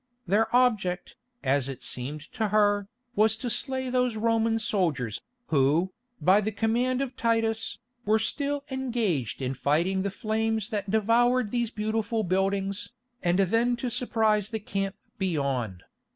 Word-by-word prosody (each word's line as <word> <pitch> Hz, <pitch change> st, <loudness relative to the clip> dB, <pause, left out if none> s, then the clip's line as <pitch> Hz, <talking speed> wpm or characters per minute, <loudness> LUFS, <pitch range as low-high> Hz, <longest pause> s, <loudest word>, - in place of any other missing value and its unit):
Their 210 Hz, +4 st, +3 dB
object, 210 Hz, -8 st, +1 dB, 0.3 s
as 135 Hz, 0 st, +2 dB
it 135 Hz, -, -7 dB
seemed 140 Hz, +5 st, -3 dB
to 220 Hz, -, -1 dB
her, 205 Hz, -1 st, +2 dB, 0.3 s
was 220 Hz, +1 st, +4 dB
to 245 Hz, +1 st, -2 dB
slay 260 Hz, +2 st, -1 dB
those 250 Hz, -2 st, +1 dB
Roman 225 Hz, 0 st, +2 dB
soldiers, 165 Hz, -, -1 dB, 0.3 s
who, 155 Hz, +6 st, +2 dB, 0.3 s
by 195 Hz, +3 st, +5 dB
the 215 Hz, +1 st, -1 dB
command 240 Hz, +5 st, +1 dB
of 260 Hz, -2 st, -6 dB
Titus, 225 Hz, -1 st, 0 dB, 0.3 s
were 215 Hz, 0 st, +3 dB
still 280 Hz, +5 st, -1 dB
engaged 225 Hz, -, -1 dB
in 130 Hz, +1 st, -1 dB
fighting 170 Hz, +8 st, +1 dB
the 200 Hz, -, -1 dB
flames 220 Hz, +1 st, -1 dB
that 205 Hz, -4 st, -3 dB
devoured 230 Hz, +2 st, +3 dB
these 240 Hz, -2 st, 0 dB
beautiful 220 Hz, 0 st, -1 dB
buildings, 195 Hz, +1 st, 0 dB, 0.3 s
and 175 Hz, 0 st, +2 dB
then 230 Hz, +6 st, +2 dB
to 240 Hz, 0 st, -3 dB
surprise 220 Hz, -4 st, +1 dB
the 220 Hz, -, -3 dB
camp 195 Hz, -1 st, -3 dB, 0.2 s
beyond. 135 Hz, -, -1 dB
215 Hz, 140 wpm, -27 LUFS, 185-230 Hz, 0.3 s, by